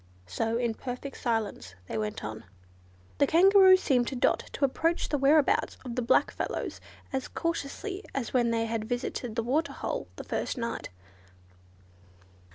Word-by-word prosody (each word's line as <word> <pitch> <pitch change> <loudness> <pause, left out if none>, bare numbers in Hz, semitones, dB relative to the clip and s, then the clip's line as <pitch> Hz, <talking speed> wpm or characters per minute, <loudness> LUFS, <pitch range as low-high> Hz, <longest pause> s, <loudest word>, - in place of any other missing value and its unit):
So 225 - -1
in 235 -2 0
perfect 255 +3 -6
silence 215 - -2
they - - -5
went 105 -1 -3
on. 110 0 -6 0.8
The 280 - +5
Kangaroo 375 +3 +7
seemed 255 -9 +1
to - - -3
Dot 245 - +1
to 280 - +2
approach 325 +5 0
the 295 - +1
whereabouts 285 +2 +3
of 245 - -4
the 250 - 0
black 235 - +3
fellows - - -4 0.3
as 265 -1 -2
cautiously 335 +5 -3
as 265 -4 -3
when 240 -2 +3
they 230 0 +1
had 225 -1 -2
visited 245 -2 -3
the 230 - 0
water 295 +8 0
hole - - -4
the - - -7
first - - -3
night. 235 -1 -3
250 Hz, 160 wpm, -29 LUFS, 230-295 Hz, 0.8 s, Kangaroo